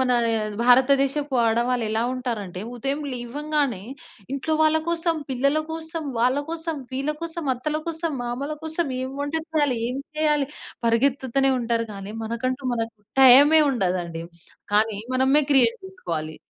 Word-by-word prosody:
మనా 250 -1 +3 0.5
భారతదేశపు 275 +3 +3
ఆడవాళ్ళు 235 +1 +1
ఎలా 220 +1 0
ఉంటారంటే, 215 -8 -4 0.2
ఉదయం 275 +5 -2
లేవంగానే, 270 -2 -2 0.5
ఇంట్లో 310 +3 -1
వాళ్ళ 310 0 +4
కోసం, 335 0 +1 0.2
పిల్లల 280 +4 +1
కోసం, 325 0 -5 0.2
వాళ్ళ 255 +3 +3
కోసం, 330 -1 -3 0.2
వీళ్ళ 275 +3 -1
కోసం, 335 -1 -4
అత్తల 305 +5 -3
కోసం, 330 -1 -2
మామల 265 +5 -3
కోసం, 320 +1 -1
ఏం 260 +1 -4
వంట 290 +2 -3 0.2
చెయ్యలి, 290 -5 +1
ఏం 260 - -4 0.2
చెయ్యాలి, 300 -3 +2 0.4
పరిగెత్తుతనే 265 +2 +2
ఉంటారు, 230 -1 -1
కానీ 200 +1 -7
మనకంటూ 255 +4 -2
మనకు 225 -1 -3 0.3
టైమే 285 +5 +8
ఉండదండి, 180 -7 -2 0.5
కానీ 215 -1 +2 0.2
మనమే 265 +3 +4
క్రియేట్ 240 -4 +4
చేసుకోవాలి. 160 - -5
265 Hz, 130 wpm, -24 LUFS, 235-300 Hz, 0.5 s, టైమే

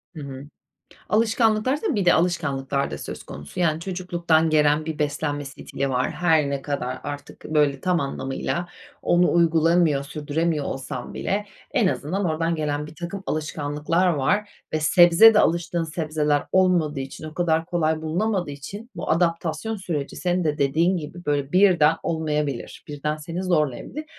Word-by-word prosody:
Hı 155 - -7
hı. 135 -1 -7 0.7
Alışkanlıklarsa 225 - +2
bir 200 -3 0
de 175 - +6
alışkanlıklar 140 -5 0
da - - -5
söz - - -7
konusu. 75 - -8
Yani, 160 -2 +1
çocukluktan 170 -3 0
gelen 150 0 +3
bir 160 -1 -5
beslenme 145 0 -1
stili 135 0 -4
var. 125 0 0
Her 160 -5 +2
ne 140 -1 -3
kadar 140 -3 -3
artık 145 0 -8
böyle 150 -3 +1
tam 180 +1 +1
anlamıyla 140 +5 -3 0.4
onu 175 +1 +3
uygulamıyor, 165 -3 +3
sürdüremiyor 150 +1 -2
olsam 130 -2 -5
bile 205 +1 -2 0.2
en 245 -9 +2
azından 185 +3 -1
oradan 165 0 0
gelen 150 -1 -2
birtakım 175 +5 -7
alışkanlıklar 155 +3 -1
var 180 +6 +1 0.2
ve 155 - 0
sebze 175 +7 +7
de - - +5
alıştığın 170 0 +1
sebzeler 155 -3 0
olmadığı 175 -6 +2
için, 135 +3 -7
o 155 - -8
kadar 165 -2 +1
kolay 160 -3 0
bulunamadığı 180 +2 -1
için 200 - -8
bu - - -4
adaptasyon 165 +5 0
süreci 160 -8 -4
senin 180 0 0
de 150 -1 0
dediğin 160 +6 +2
gibi 170 +2 -7
böyle 145 -1 -1
birden 175 -5 +5
olmayabilir, 150 -5 -2
birden 150 +1 -3
seni 165 +4 -5
zorlayabilir. 170 - -1
160 Hz, 150 wpm, -24 LUFS, 145-175 Hz, 0.7 s, sebze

